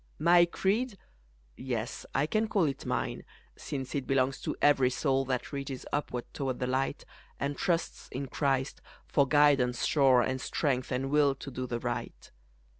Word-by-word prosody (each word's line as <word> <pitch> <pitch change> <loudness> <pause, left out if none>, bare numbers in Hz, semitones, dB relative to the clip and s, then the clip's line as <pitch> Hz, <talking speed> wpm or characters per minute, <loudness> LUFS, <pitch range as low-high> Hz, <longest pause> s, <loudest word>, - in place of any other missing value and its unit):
My 175 +1 +6
creed 205 +6 0 0.6
yes, 120 -3 -4
I 135 +2 +3
can 215 +7 0
call 205 -4 +2
it 140 -4 -2
mine, - - -2 0.3
Since 135 -3 -5
it 140 -3 -2
belongs 135 0 +1
to - - -3
every 135 -3 +4
soul 135 +1 0
That 130 +2 -3
reaches 140 -2 -5
upward 125 -4 -2
toward 130 -3 -2
the 125 - -2
light, 130 +2 -1 0.3
And 140 +1 -1
trusts 170 +1 -2
in 140 +2 -4
Christ 135 -1 -1 0.2
for 140 -1 +2
guidance 140 -4 +3
sure, 135 -4 +5
And 130 +1 -2
strength 130 -4 -1
and 135 +2 -1
will 145 -2 +4
to 135 +1 -8
do 130 0 -4
the 120 - -2
right. 120 0 -5
135 Hz, 165 wpm, -30 LUFS, 130-150 Hz, 0.6 s, My